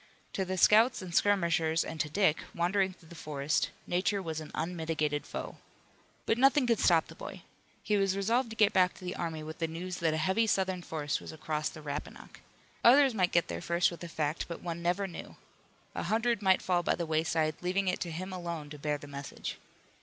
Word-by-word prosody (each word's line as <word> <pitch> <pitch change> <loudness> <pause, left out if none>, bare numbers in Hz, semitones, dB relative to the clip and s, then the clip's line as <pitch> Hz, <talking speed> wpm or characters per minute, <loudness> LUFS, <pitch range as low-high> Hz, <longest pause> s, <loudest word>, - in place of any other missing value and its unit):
To 190 - 0
the 185 0 -3
scouts 220 +3 +5
and 175 -2 -7
skirmishers 170 -5 +2
and 160 - -6
to 150 - 0
Dick, 175 -2 +3 0.2
wandering 190 +2 +1
through 165 -3 -20
the - - -11
forest, 150 -2 -1 0.2
nature 185 +3 0
was 160 -4 -4
an 155 - -8
unmitigated 160 -3 -2
foe. - - -6 0.7
But 225 - +1
nothing 270 +1 +5
could 230 -3 +2
stop 165 -3 +4
the - - -12
boy. - - -9 0.4
He 210 - +1
was 195 -1 +2
resolved 230 +5 +1
to 225 - -7
get 215 -2 +4
back 180 -1 +3
to 185 - -11
the 180 - -3
army 160 -2 -4
with 155 +2 -8
the 165 - 0
news 180 +3 -5
that 160 -2 +1
a - - -1
heavy 190 +8 +2
Southern 190 -3 +1
force 150 -4 -2
was - - -9
across 155 -1 -2
the 155 - -11
Rappahannock. 145 0 -7 0.4
Others 265 +2 +7
might 185 -5 +1
get 170 - +3
there - - -4
first 170 +1 +2
with 170 - -8
the 170 - -6
fact, 155 0 -2
but 170 - -7
one 170 -1 -4
never 175 +3 +1
knew. 180 -3 -8 0.6
A - - -3
hundred 230 0 +1
might 190 -2 +3
fall 180 -1 +2
by - - +1
the 170 - -3
wayside, 160 0 +1
leaving 190 +2 0
it 180 - +1
to 175 - -3
him 185 +4 -5
alone 170 -4 -5
to 150 - -8
bear 150 0 -1
the 145 - -11
message. 140 -1 -6
175 Hz, 215 wpm, -31 LUFS, 160-195 Hz, 0.7 s, Others